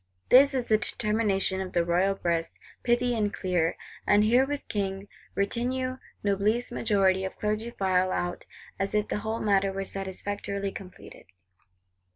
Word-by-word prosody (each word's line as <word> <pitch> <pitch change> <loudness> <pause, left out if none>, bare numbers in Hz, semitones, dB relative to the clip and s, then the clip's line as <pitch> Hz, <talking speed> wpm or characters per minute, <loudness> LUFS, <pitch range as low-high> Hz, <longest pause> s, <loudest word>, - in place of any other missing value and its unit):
This 275 +2 +7
is 250 -2 0
the 215 -2 +3
determination 210 -4 0
of 185 - -6
the 170 -1 +2
royal 180 +3 +2
breast: 170 -3 -2 0.2
pithy 240 0 +2
and 210 -2 0
clear. 175 -4 0 0.3
And 205 0 +5
herewith 265 +6 +2
King, 195 -1 -3 0.3
retinue, 255 +5 -1 0.3
Noblesse, 210 +5 +1
majority 195 -5 +2
of 190 - -4
Clergy 215 +2 -2
file 185 -4 +1
out, 175 -1 -3 0.3
as 195 +2 -1
if 210 0 +1
the - - -1
whole 220 +2 -3
matter 195 -2 +2
were 195 0 -3
satisfactorily 200 +1 -4
completed. 190 -2 -11
200 Hz, 145 wpm, -28 LUFS, 190-225 Hz, 0.3 s, This